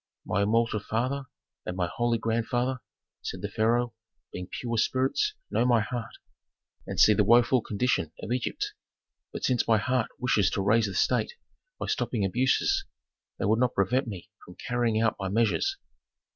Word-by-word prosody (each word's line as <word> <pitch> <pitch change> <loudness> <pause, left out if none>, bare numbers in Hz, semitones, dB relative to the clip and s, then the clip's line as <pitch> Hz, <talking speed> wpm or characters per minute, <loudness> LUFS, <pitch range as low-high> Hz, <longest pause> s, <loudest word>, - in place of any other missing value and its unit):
"My 100 - 0
immortal 110 +1 +2
father 130 +6 -2 0.4
and 90 - -5
my 90 - +1
holy 120 +7 0
grandfather," 120 +3 -1 0.4
said - - -6
the - - -2
pharaoh, 120 +2 +1 0.4
"being 90 0 -5
pure 115 -2 -4
spirits 135 - +1 0.2
know - - +2
my 120 -2 +4
heart, 115 0 -4 0.7
and - - -4
see 105 - +7
the 105 - +3
woful 120 +3 +5
condition 105 -7 0
of 105 - -6
Egypt. 125 -1 -2 0.6
But - - -7
since 125 -2 +1
my 115 -1 +5
heart 125 +3 0
wishes 115 -6 +2
to - - 0
raise 110 +2 +3
the 100 - -6
state - - +1 0.5
by - - -3
stopping 120 - -1
abuses 125 +7 +2 0.5
they - - -2
would 110 +3 +3
not 125 -1 +1
prevent 125 +7 +1
me 95 -6 -8
from 90 - -13
carrying 120 0 0
out 110 -1 +1
my 95 -1 -2
measures." 115 - +1
115 Hz, 165 wpm, -28 LUFS, 105-125 Hz, 0.7 s, see